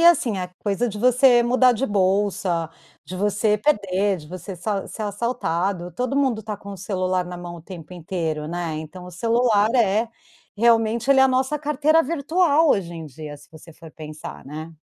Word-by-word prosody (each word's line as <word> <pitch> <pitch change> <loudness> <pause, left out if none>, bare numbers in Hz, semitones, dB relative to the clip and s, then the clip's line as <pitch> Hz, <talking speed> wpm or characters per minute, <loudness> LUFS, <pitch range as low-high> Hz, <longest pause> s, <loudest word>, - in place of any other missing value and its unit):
é 340 - +9
assim, 250 - +2
a 180 -1 -3
coisa 210 +4 0
de 210 -1 -6
você 250 +1 +5
mudar 255 +1 +4
de 245 +3 -1
bolsa, 190 -4 0 0.3
de 175 +5 -8
você 205 +2 +1
perder, 200 -6 +1
de 150 - -12
você 185 +3 -8
so 195 +3 -3
ser 220 - -6
assaltado. 200 -4 -2
Todo 250 +7 -2
mundo 260 -6 +1
tá 210 0 -5
com 200 0 -11
o - - -7
celular 185 -1 -1
na 180 0 -7
mão 175 0 -8
o 165 - -12
tempo 175 -1 -10
inteiro, 165 -3 -3
né, 170 -2 -3
então 170 +4 -9
o 180 - -9
celular 225 +2 +2
é 225 -1 +2 0.5
realmente, 230 +2 +3
ele 270 -1 +6
é - - +8
a 265 - +5
nossa 260 +3 +1
carteira 300 +2 +2
virtual 320 +1 +2
hoje 175 -4 0
em 165 -2 -7
dia, 150 +1 -9
se 145 +1 -18
você 160 +1 -14
for 160 0 -13
pensar, 155 -1 -9
né. 155 +4 -8
200 Hz, 195 wpm, -23 LUFS, 175-240 Hz, 0.5 s, é